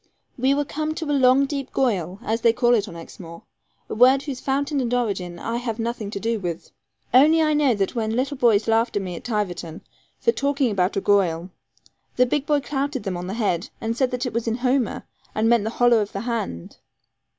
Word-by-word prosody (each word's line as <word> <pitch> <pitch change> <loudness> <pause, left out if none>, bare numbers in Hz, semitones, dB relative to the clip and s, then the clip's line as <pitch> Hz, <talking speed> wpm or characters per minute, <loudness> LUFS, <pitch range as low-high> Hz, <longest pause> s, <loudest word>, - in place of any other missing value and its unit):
We 265 +2 +2
were 290 0 0
come 310 +2 -3
to 320 - -4
a - - +2
long 265 0 +4
deep 275 -1 -5
'goyal,' 195 -7 -1
as 225 0 -1
they 230 0 +4
call 240 0 +3
it 215 -3 +2
on 170 - -9
Exmoor, 170 0 -11 0.4
a - - -5
word 260 +4 +5
whose 275 -4 -5
fountain 280 +1 -1
and 240 -2 -2
origin 195 -8 -1
I 230 +6 -3
have 235 -2 -3
nothing 230 -2 -3
to 200 - -5
do 225 +1 -1
with. 175 -3 -5 0.4
Only 300 +6 +6
I 310 -1 +3
know 290 -5 +3
that 195 -1 -1
when 225 -2 -1
little 265 +3 -1
boys 225 -4 +3
laughed 225 +1 +2
at 205 - +1
me 180 -2 -5
at - - -9
Tiverton, 180 -8 -3 0.4
for 465 - +3
talking 280 - 0
about 190 -1 0
a - - +1
'goyal,' 185 -4 +1 0.7
a 250 - +5
big 285 +3 -1
boy 295 -1 +2
clouted 275 -2 -3
them 195 -3 -3
on 175 +1 -5
the 195 - -4
head, 200 -6 -1
and 225 +1 -2
said 260 +1 +1
that 250 +1 -3
it 250 - -4
was 230 0 -2
in 225 - +1
Homer, 255 -2 +1 0.3
and 220 +1 +1
meant 235 -2 +3
the - - 0
hollow 240 0 +3
of 205 -1 -3
the 195 - -3
hand. 225 - -4
235 Hz, 225 wpm, -23 LUFS, 200-265 Hz, 0.7 s, Only